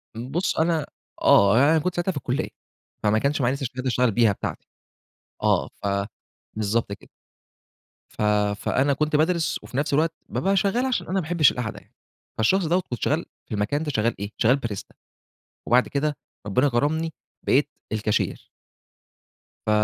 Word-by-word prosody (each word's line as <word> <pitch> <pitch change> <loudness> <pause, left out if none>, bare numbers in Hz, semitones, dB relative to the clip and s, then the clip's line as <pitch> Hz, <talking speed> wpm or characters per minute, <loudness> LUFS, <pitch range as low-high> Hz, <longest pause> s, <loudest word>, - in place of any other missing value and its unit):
بُصّ، 135 - -2
أنا 160 -2 +2 0.4
آه 100 +3 +6
يعني 140 +4 +5
أنا 160 - +4
كنت 180 +3 -2
ساعتها 175 +2 0
في 160 - -6
الكُلّية، 140 - -2 0.5
فماكنش 110 +8 +2
معايا 125 +2 +2
لسه 140 -1 -4
شهادة 130 +2 -4
أشتغل 125 -1 +2
بيها 115 0 +4
بتاعتي، 100 - -5 0.8
آه - - +3 0.2
ف - - 0 0.7
بالضبط 110 0 -1
كده. 100 - -9 1.0
ف - - -8 0.4
فأنا 140 +6 +1
كنت 150 +2 0
بادرس، 160 +1 +1
وفي 130 - -7
نفس 145 +1 0
الوقت 160 +3 +2 0.2
بابقى 195 +1 +1
شغال 210 +6 +2
عشان 260 - -1
أنا 185 - -2
ما - - +3
باحبش 160 -3 +4
القعدة 120 -3 -4
يعني، - - -28 0.4
فالشخص 180 - +3
دوَّة 175 +4 +2
كنت 120 - -5
شغال 155 +4 +1 0.2
في - - -8
المكان 125 +9 0
ده 150 - -2
شغال 115 -2 +1
إيه؟ 100 0 -4
شغال 125 +4 +3
Barista، 105 -3 -7 0.7
وبعد 125 +1 +4
كده 145 +1 -1 0.3
ربنا 125 +8 +3
كرمني 155 +6 0 0.3
بقيت 145 +2 +3 0.2
الكاشير. 110 -1 -1 1.2
ف - - +2
140 Hz, 160 wpm, -24 LUFS, 115-160 Hz, 1.2 s, آه